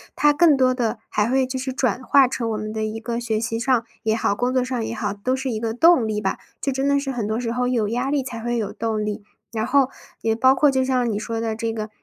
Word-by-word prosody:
它 295 Hz, 0 st, +4 dB
更 310 Hz, -2 st, +5 dB
多 255 Hz, -1 st, +3 dB
的， 240 Hz, -3 st, -1 dB
还 210 Hz, +2 st, 0 dB
会 265 Hz, +1 st, +2 dB
就 260 Hz, 0 st, -4 dB
是 260 Hz, +1 st, -3 dB
转 255 Hz, -3 st, 0 dB
化 270 Hz, +1 st, +5 dB
成 240 Hz, -2 st, -3 dB
我 220 Hz, -, -2 dB
们 215 Hz, 0 st, -5 dB
的 220 Hz, 0 st, -2 dB
一 215 Hz, +1 st, -3 dB
个 235 Hz, +1 st, -3 dB
学 225 Hz, -2 st, -1 dB
习 225 Hz, 0 st, -2 dB
上 245 Hz, -1 st, +1 dB, 0.2 s
也 220 Hz, 0 st, +1 dB
好、 220 Hz, -, +1 dB
工 245 Hz, +4 st, 0 dB
作 255 Hz, -1 st, +2 dB
上 250 Hz, -2 st, -2 dB
也 230 Hz, -, -4 dB
好， 205 Hz, -2 st, -2 dB
都 210 Hz, +6 st, -1 dB
是 265 Hz, 0 st, -3 dB
一 220 Hz, -, -2 dB
个 225 Hz, 0 st, -2 dB
动 260 Hz, 0 st, +5 dB
力 215 Hz, -1 st, -1 dB
吧， 190 Hz, -2 st, -2 dB, 0.2 s
就 275 Hz, -, -1 dB
真 270 Hz, +1 st, -1 dB
的 280 Hz, 0 st, +3 dB
是 275 Hz, -1 st, -3 dB
很 235 Hz, -5 st, -3 dB
多 220 Hz, +2 st, -1 dB
时 235 Hz, -2 st, -2 dB
候 245 Hz, +1 st, 0 dB
有 235 Hz, -4 st, +1 dB
压 245 Hz, +4 st, -1 dB
力 285 Hz, -1 st, +1 dB
才 235 Hz, -3 st, -6 dB
会 240 Hz, +1 st, -1 dB
有 210 Hz, -3 st, -3 dB
动 220 Hz, -2 st, -2 dB
力。 210 Hz, 0 st, -4 dB, 0.3 s
然 220 Hz, -2 st, -2 dB
后， 270 Hz, 0 st, +3 dB, 0.3 s
也 225 Hz, 0 st, +1 dB
包 260 Hz, +3 st, +5 dB
括 290 Hz, +2 st, +4 dB
就 265 Hz, -1 st, +1 dB
像 255 Hz, -2 st, +1 dB
你 205 Hz, -, -1 dB
说 225 Hz, +1 st, -3 dB
的 225 Hz, -1 st, -2 dB
这 225 Hz, 0 st, -2 dB
个， 215 Hz, -1 st, -4 dB
235 Hz, 305 characters per minute, -22 LUFS, 220-260 Hz, 0.3 s, 更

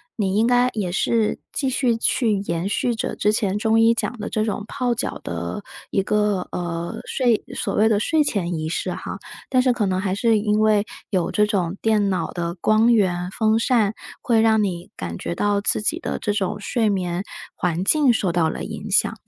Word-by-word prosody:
你 195 Hz, -3 st, -1 dB
应 225 Hz, +2 st, +3 dB
该 245 Hz, 0 st, +4 dB
也 195 Hz, -5 st, -2 dB
是 220 Hz, +3 st, +1 dB
继 270 Hz, -, 0 dB
续 250 Hz, -2 st, +1 dB
去 230 Hz, 0 st, +1 dB
延 175 Hz, -2 st, -2 dB
续 235 Hz, +3 st, 0 dB
着 220 Hz, -, -3 dB
之 210 Hz, -, +2 dB
前 210 Hz, -2 st, 0 dB
中 225 Hz, +1 st, +2 dB
医 225 Hz, +1 st, +5 dB
讲 240 Hz, +1 st, -3 dB
的 210 Hz, -, -4 dB
这 215 Hz, -, -1 dB
种 210 Hz, -1 st, -3 dB
泡 250 Hz, -2 st, -1 dB
脚 240 Hz, -, -3 dB
的 85 Hz, -, -4 dB, 0.3 s
一 195 Hz, -, +2 dB
个， 210 Hz, -1 st, 0 dB
呃， 170 Hz, -1 st, -4 dB
睡 240 Hz, -5 st, +1 dB
所 -, -, -2 dB
谓 215 Hz, -, +4 dB
的 215 Hz, -2 st, +3 dB
睡 310 Hz, +8 st, +2 dB
前 180 Hz, -10 st, -1 dB
仪 155 Hz, 0 st, -3 dB
式 165 Hz, -, -2 dB
哈。 -, -, -6 dB, 0.3 s
但 255 Hz, -1 st, +3 dB
是 255 Hz, 0 st, +3 dB
可 230 Hz, -3 st, 0 dB
能 185 Hz, -1 st, 0 dB
还 190 Hz, -1 st, -1 dB
是 225 Hz, 0 st, +2 dB
因 210 Hz, 0 st, +1 dB
为 215 Hz, -1 st, +4 dB, 0.3 s
有 180 Hz, -4 st, +1 dB
这 210 Hz, -, +2 dB
种 190 Hz, -3 st, -1 dB
电 215 Hz, -2 st, +2 dB
脑 175 Hz, -4 st, -1 dB
的 170 Hz, 0 st, -3 dB
光 215 Hz, +6 st, +3 dB
源， 180 Hz, -5 st, +1 dB
风 220 Hz, +2 st, +1 dB
扇， 225 Hz, -3 st, +2 dB, 0.3 s
会 230 Hz, -3 st, +3 dB
让 220 Hz, -1 st, +4 dB
你 175 Hz, -3 st, -3 dB
感 85 Hz, -2 st, -5 dB
觉 170 Hz, -, -4 dB
到 205 Hz, +1 st, +1 dB
自 210 Hz, -, +1 dB
己 315 Hz, +10 st, 0 dB
的 -, -, -3 dB
这 205 Hz, -, -1 dB
种 205 Hz, 0 st, -2 dB
睡 220 Hz, +1 st, 0 dB
眠 180 Hz, -3 st, -1 dB, 0.3 s
环 180 Hz, -1 st, -1 dB
境 285 Hz, +5 st, +4 dB
受 195 Hz, -6 st, 0 dB
到 170 Hz, -2 st, +2 dB
了 -, -, -5 dB
影 -, -, -6 dB
响。 -, -, +3 dB
210 Hz, 225 characters per minute, -22 LUFS, 185-225 Hz, 0.3 s, 医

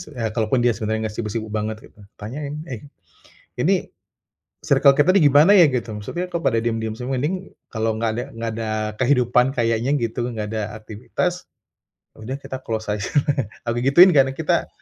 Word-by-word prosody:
s -, -, -10 dB, 0.2 s
kalaupun 115 Hz, +2 st, 0 dB
dia 120 Hz, -, +4 dB
sebenarnya 110 Hz, +1 st, -2 dB
enggak 105 Hz, -, -10 dB
sibuk-sibuk 110 Hz, 0 st, -4 dB
banget, 110 Hz, 0 st, -2 dB, 0.2 s
gitu. -, -, -21 dB, 0.2 s
Tanyain, 140 Hz, +7 st, -6 dB, 0.2 s
"Eh, 115 Hz, -, -5 dB, 0.8 s
ini -, -, +1 dB, 0.7 s
circle 140 Hz, -1 st, +5 dB
kita 165 Hz, +5 st, +4 dB
nih, 165 Hz, -7 st, +5 dB
gimana 150 Hz, +7 st, +6 dB
ya 180 Hz, -7 st, +7 dB
gitu, 120 Hz, -4 st, -3 dB
maksudnya 105 Hz, -, -4 dB
kok 170 Hz, -, -1 dB
pada 115 Hz, -7 st, +1 dB
diem-diem 115 Hz, -1 st, -2 dB
semua, 125 Hz, +2 st, -3 dB
mending 185 Hz, +7 st, -3 dB, 0.2 s
kalau 110 Hz, 0 st, -1 dB
enggak 115 Hz, -1 st, +1 dB
ada 120 Hz, -, -2 dB
enggak 115 Hz, 0 st, -4 dB
ada 110 Hz, -1 st, -3 dB, 0.3 s
kehidupan 125 Hz, 0 st, +2 dB
kayaknya 120 Hz, +1 st, 0 dB
gitu, 115 Hz, +1 st, -2 dB
enggak 105 Hz, -2 st, -4 dB
ada 110 Hz, -1 st, -3 dB
aktivitas, 130 Hz, -, -4 dB, 0.7 s
ya -, -, -28 dB
udah 130 Hz, +4 st, -4 dB
kita 130 Hz, -, -6 dB
close 110 Hz, -1 st, -4 dB
aja". 105 Hz, -1 st, -3 dB, 0.6 s
Aku 120 Hz, +1 st, 0 dB
gituin, 170 Hz, +8 st, +7 dB
karena 135 Hz, -2 st, +4 dB
kita 160 Hz, -, 0 dB
120 Hz, 175 wpm, -22 LUFS, 110-140 Hz, 0.8 s, ya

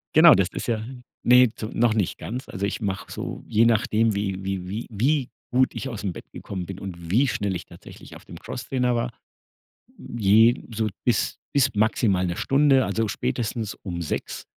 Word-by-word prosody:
Genau, 160 Hz, 0 st, +9 dB
das 95 Hz, -2 st, +2 dB
ist -, -, -5 dB
ja 110 Hz, -2 st, -1 dB, 0.4 s
ne, 125 Hz, 0 st, +6 dB
zu 110 Hz, -, -5 dB
noch 115 Hz, -1 st, +3 dB
nicht 105 Hz, -6 st, -1 dB
ganz. 125 Hz, +4 st, -6 dB
Also, 100 Hz, +2 st, -3 dB
ich 105 Hz, -, -3 dB
mache 100 Hz, 0 st, -3 dB
so, -, -, -6 dB
je 115 Hz, +2 st, +3 dB
nachdem, 110 Hz, 0 st, +2 dB
wie 95 Hz, -1 st, -2 dB
wie 95 Hz, -2 st, -3 dB
wie 105 Hz, +5 st, -5 dB
wie 130 Hz, +5 st, +1 dB, 0.2 s
gut 130 Hz, 0 st, +3 dB
ich 135 Hz, -, -4 dB
aus'm 105 Hz, -5 st, -4 dB
Bett -, -, -10 dB
gekommen 95 Hz, -3 st, -6 dB
bin 95 Hz, 0 st, -7 dB
und 85 Hz, -4 st, -7 dB
wie 130 Hz, +8 st, +4 dB
schnell 100 Hz, -5 st, -1 dB
ich -, -, -6 dB
tatsächlich -, -, -13 dB
auf -, -, -14 dB
dem -, -, -10 dB
Crosstrainer 125 Hz, 0 st, -2 dB
war, 120 Hz, +1 st, -1 dB, 0.9 s
je 115 Hz, +2 st, +3 dB
so 110 Hz, 0 st, 0 dB, 0.2 s
bis 120 Hz, -4 st, +1 dB, 0.2 s
bis 135 Hz, -2 st, +4 dB
maximal 105 Hz, -3 st, +2 dB
1 85 Hz, 0 st, -3 dB
Stunde, 135 Hz, 0 st, +3 dB
also, 110 Hz, -1 st, -1 dB
spätestens 110 Hz, 0 st, -2 dB
um 85 Hz, -3 st, -4 dB
6:00 80 Hz, -, -4 dB
110 Hz, 185 wpm, -24 LUFS, 100-125 Hz, 0.9 s, Genau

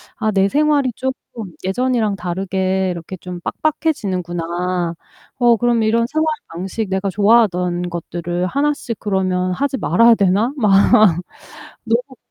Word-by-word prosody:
아 220 Hz, -3 st, -1 dB
'내 195 Hz, -1 st, +2 dB
생활이 290 Hz, -1 st, +2 dB
쪼끔 250 Hz, -6 st, -6 dB
예전이랑 220 Hz, +1 st, 0 dB
다르게 190 Hz, +1 st, -1 dB
이렇게 175 Hz, +1 st, -6 dB
좀 180 Hz, 0 st, -8 dB
빡빡해지는구나. 180 Hz, -, -2 dB, 0.4 s
어 240 Hz, -2 st, +4 dB
그럼 240 Hz, -1 st, +1 dB
이런 230 Hz, +2 st, +2 dB
생활 315 Hz, +4 st, 0 dB, 0.2 s
방식, 190 Hz, +5 st, -5 dB
내가 190 Hz, +1 st, -1 dB
좋아하던 180 Hz, -4 st, +2 dB
것들을 175 Hz, +1 st, -3 dB
하나씩 280 Hz, -2 st, -1 dB
그러면 185 Hz, -2 st, 0 dB
하지 275 Hz, +6 st, -1 dB
말아야 230 Hz, +4 st, +4 dB
되나?' 200 Hz, +4 st, +2 dB
막 215 Hz, -6 st, +2 dB, 1.1 s
너무 245 Hz, +3 st, -1 dB
195 Hz, 290 characters per minute, -18 LUFS, 180-240 Hz, 1.1 s, 어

